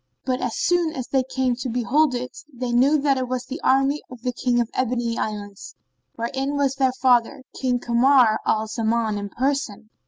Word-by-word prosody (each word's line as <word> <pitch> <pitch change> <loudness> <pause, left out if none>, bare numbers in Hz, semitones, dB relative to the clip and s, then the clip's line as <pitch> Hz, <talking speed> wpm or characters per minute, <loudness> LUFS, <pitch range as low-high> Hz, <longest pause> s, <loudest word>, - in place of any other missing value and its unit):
But 255 -1 -1
as 245 -3 -2
soon 345 -2 +1
as 255 -2 -5
they 265 - +2
came 255 -1 -1
to 255 0 -4
it - - -4
behold, 255 +3 +2 0.4
they 250 -2 -4
knew 265 +6 +4
that 275 -2 +1
it 255 - -2
was 255 0 -3
the 280 +5 -7
army 270 +2 +2
of 250 -2 -12
the 250 -1 -1
King 245 0 0
of 235 -1 -1
the - - -5
Ebony 240 -2 -1
Islands, 205 -3 -5 0.4
wherein 270 +5 -2
was 275 -2 +1
their 265 -2 +1
father, 250 +1 +3 0.2
King 250 -2 +1
Kamar 240 -1 +4
al 220 0 +1
Zaman 220 -1 -1
in 200 0 -5
person. 245 -4 -2
250 Hz, 195 wpm, -23 LUFS, 235-270 Hz, 0.4 s, knew